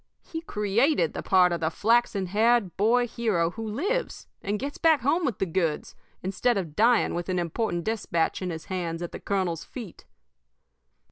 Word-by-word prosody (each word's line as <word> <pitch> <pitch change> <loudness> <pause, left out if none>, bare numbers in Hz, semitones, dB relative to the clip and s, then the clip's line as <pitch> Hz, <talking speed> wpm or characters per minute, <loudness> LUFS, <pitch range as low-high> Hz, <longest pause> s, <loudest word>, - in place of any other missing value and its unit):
He 325 -2 -6
created 210 - +1
the - - -4
part 185 -2 +4
of 170 - -1
the 160 - 0
flaxen 215 +1 +2
haired 215 0 +2
boy 235 +4 +3
hero 210 -8 0
who 225 +3 -6
lives 390 - -2 0.2
and 205 +2 -1
gets 280 +5 -5
back 320 -5 +4
home 315 +7 +1
with 240 -8 -1
the - - 0
goods, 165 -3 -2 0.3
instead 200 +5 +1
of 165 -6 -4
dying 235 +2 +3
with 175 +1 -4
an 185 - 0
important 175 +1 -1
despatch 195 -7 -1
in 185 - -2
his 160 -2 -6
hands 175 -2 -3
at 175 - -6
his - - -7
colonel's 185 -5 -1
feet. 225 -9 -10
200 Hz, 180 wpm, -26 LUFS, 175-240 Hz, 0.3 s, part